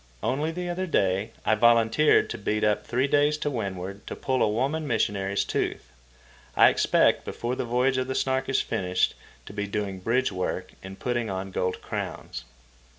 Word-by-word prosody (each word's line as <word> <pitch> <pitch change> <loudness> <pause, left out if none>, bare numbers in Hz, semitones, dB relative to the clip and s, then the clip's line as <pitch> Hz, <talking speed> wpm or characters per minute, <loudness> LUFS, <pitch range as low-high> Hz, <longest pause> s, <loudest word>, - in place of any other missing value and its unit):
Only 150 +4 0
the 175 +2 -4
other 180 +2 -2
day 100 - +1 0.2
I - - +4
volunteered 115 +5 +4
to - - -5
beat 105 +1 -1
up 105 -1 +1
three 125 +2 +1
days 145 +1 +3
to 145 -1 -2
windward 100 -4 -5
to - - -5
pull 130 -1 -1
a - - +4
woman 140 +8 -1
missionary's 100 -4 0
tooth. 65 - -3 0.6
I - - +7
expect, - - +3
before 120 +2 -3
the - - -3
voyage 125 +2 +1
of 130 - -2
the 130 - -3
Snark 130 0 0
is 135 - +2
finished, 90 0 0 0.3
to - - -10
be 100 0 -3
doing 100 -2 -3
bridge 120 +6 +1
work 90 -1 -3
and 95 0 -9
putting 120 -3 -2
on 95 0 -4
gold 90 0 -2
crowns. - - -5
115 Hz, 180 wpm, -26 LUFS, 100-130 Hz, 0.6 s, I